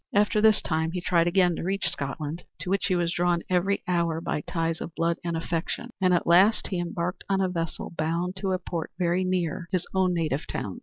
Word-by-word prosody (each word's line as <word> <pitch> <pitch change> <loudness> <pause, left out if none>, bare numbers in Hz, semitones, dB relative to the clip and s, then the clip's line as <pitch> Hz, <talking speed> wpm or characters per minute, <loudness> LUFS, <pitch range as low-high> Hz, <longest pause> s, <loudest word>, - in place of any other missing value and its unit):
After 210 +1 +3
this 220 -1 +5
time 160 0 0
he 180 - -1
tried 170 -1 +2
again 175 -1 +3
to - - -4
reach 190 0 0
Scotland, 150 0 -3 0.2
to 180 - -3
which 195 -1 +1
he 185 - +2
was 170 -1 +1
drawn 175 -1 +1
every 185 +2 +1
hour 170 -2 +1
by 155 -2 -2
ties 165 +1 -2
of 165 - -6
blood 170 0 +1
and 170 -1 -1
affection; 170 +8 -3
and 185 -1 +4
at 175 - +2
last 190 +6 +5
he 185 - -1
embarked 175 +1 -3
on 195 -1 +2
a 190 - +2
vessel 165 -2 -4
bound 170 +4 -1
to 190 0 -1
a 185 - +2
port 170 -3 -4
very 180 0 +1
near 180 -2 -1
his 185 -3 0
own 190 -1 +3
native 155 -4 -1
town. - - -4
175 Hz, 220 wpm, -26 LUFS, 165-185 Hz, 0.2 s, this